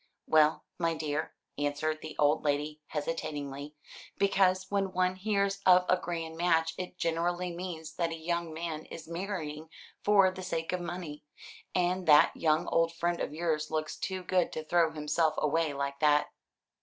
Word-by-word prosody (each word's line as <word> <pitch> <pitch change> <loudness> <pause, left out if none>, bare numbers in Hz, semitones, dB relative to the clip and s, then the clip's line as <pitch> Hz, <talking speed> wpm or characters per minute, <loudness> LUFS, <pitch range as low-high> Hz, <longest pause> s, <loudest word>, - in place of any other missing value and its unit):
"Well, 155 0 +4 0.2
my 165 -1 +1
dear," 155 0 -3 0.2
answered 145 +2 -1
the 155 - -7
old 150 +1 +3
lady 150 +1 -1
hesitatingly, 145 -2 -4 0.4
"because 190 -1 +3
when 195 -2 0
one 185 0 +1
hears 200 0 0
of 180 -1 +6
a - - +5
grand 165 -2 -5
match, 165 -1 +2
it 180 0 -6
generally 175 +1 -1
means 170 -2 -6
that 170 -1 +1
a 165 - -4
young 170 +1 -2
man 160 -1 -5
is 165 - -9
marrying 165 -4 -5 0.3
for 200 -2 +5
the 185 - -8
sake 165 -2 -3
of 180 - -1
money, 175 -4 -6 0.5
and 180 0 +1
that 150 -1 +7
young 160 +1 +2
old 165 0 +2
friend 170 0 0
of - - -2
yours 155 -1 -1
looks 155 -1 -2
too 190 -1 -4
good 180 0 +1
to 155 - -4
throw 170 +1 +3
himself 155 +1 0
away 155 +1 +1
like 140 0 -3
that." 150 0 +3
165 Hz, 165 wpm, -30 LUFS, 155-180 Hz, 0.5 s, that